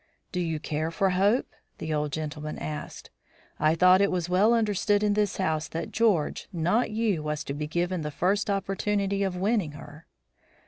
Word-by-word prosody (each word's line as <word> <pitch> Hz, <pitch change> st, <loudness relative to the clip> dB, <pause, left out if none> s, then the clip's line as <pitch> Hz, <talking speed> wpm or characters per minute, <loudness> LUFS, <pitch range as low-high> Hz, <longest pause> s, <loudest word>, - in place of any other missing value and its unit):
"Do 180 Hz, -, -2 dB
you 165 Hz, -3 st, -1 dB
care 155 Hz, +1 st, -2 dB
for 190 Hz, +3 st, +1 dB
Hope?" 200 Hz, +7 st, +3 dB, 0.3 s
the 160 Hz, 0 st, -3 dB
old 150 Hz, -1 st, -1 dB
gentleman 155 Hz, 0 st, -4 dB
asked. 75 Hz, -1 st, -6 dB, 0.5 s
"I 155 Hz, +1 st, +3 dB
thought 185 Hz, +2 st, +6 dB
it 200 Hz, -, +4 dB
was 175 Hz, -2 st, -1 dB
well 195 Hz, +5 st, +4 dB
understood 210 Hz, -2 st, +1 dB
in 210 Hz, -1 st, +3 dB
this 210 Hz, -1 st, 0 dB
house 160 Hz, -5 st, 0 dB
that 165 Hz, -, -5 dB
George, 210 Hz, -10 st, +1 dB
not 180 Hz, +8 st, +1 dB
you, 215 Hz, -6 st, 0 dB
was 150 Hz, 0 st, -3 dB
to 140 Hz, -, -4 dB
be 150 Hz, +1 st, -4 dB
given 175 Hz, +2 st, -1 dB
the 150 Hz, -, -3 dB
first 195 Hz, +8 st, 0 dB
opportunity 200 Hz, 0 st, 0 dB
of 190 Hz, -2 st, 0 dB
winning 195 Hz, -5 st, 0 dB
her." 150 Hz, +1 st, -12 dB
180 Hz, 180 wpm, -27 LUFS, 155-200 Hz, 0.5 s, thought